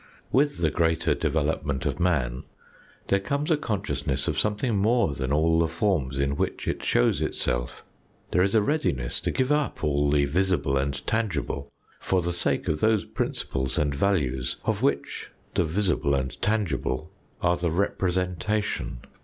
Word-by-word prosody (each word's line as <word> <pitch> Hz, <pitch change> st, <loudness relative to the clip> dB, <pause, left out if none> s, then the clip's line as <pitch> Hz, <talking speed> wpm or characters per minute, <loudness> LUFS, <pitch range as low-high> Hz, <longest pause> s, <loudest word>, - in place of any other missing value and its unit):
With 145 Hz, +3 st, +3 dB
the 80 Hz, -3 st, +1 dB
greater 80 Hz, +1 st, +2 dB
development 75 Hz, -2 st, -1 dB
of -, -, -1 dB
man 70 Hz, -9 st, +1 dB, 0.7 s
there 100 Hz, -, +4 dB
comes 140 Hz, -, -1 dB
a -, -, +6 dB
consciousness 95 Hz, -, -2 dB
of -, -, 0 dB
something 105 Hz, +2 st, 0 dB
more 110 Hz, -4 st, +2 dB
than 65 Hz, -1 st, -3 dB
all 80 Hz, +3 st, +3 dB
the 85 Hz, -, +3 dB
forms 80 Hz, -6 st, 0 dB
in 70 Hz, +1 st, +1 dB
which -, -, -2 dB
it -, -, -2 dB
shows -, -, +2 dB
itself. -, -, -1 dB, 0.5 s
There 90 Hz, -, +3 dB
is 95 Hz, +3 st, +2 dB
a 110 Hz, -, +5 dB
readiness 70 Hz, -, 0 dB
to -, -, -2 dB
give 130 Hz, +1 st, 0 dB
up 150 Hz, -, 0 dB
all 75 Hz, -1 st, +2 dB
the 70 Hz, -1 st, +3 dB
visible 90 Hz, -2 st, +1 dB
and 70 Hz, +1 st, 0 dB
tangible 105 Hz, -10 st, -2 dB, 0.3 s
for 95 Hz, -2 st, +1 dB
the 85 Hz, +1 st, -1 dB
sake 85 Hz, -, -1 dB
of 75 Hz, -, 0 dB
those 110 Hz, +1 st, +2 dB
principles 65 Hz, -1 st, -2 dB
and 75 Hz, -2 st, +1 dB
values 70 Hz, -7 st, 0 dB
of -, -, 0 dB
which -, -, -1 dB, 0.2 s
the -, -, +2 dB
visible 80 Hz, -4 st, +1 dB
and 65 Hz, 0 st, -3 dB
tangible 80 Hz, -8 st, -1 dB, 0.3 s
are 85 Hz, 0 st, +4 dB
the 85 Hz, -1 st, 0 dB
representation. 90 Hz, -, -1 dB
80 Hz, 160 wpm, -26 LUFS, 70-100 Hz, 0.7 s, a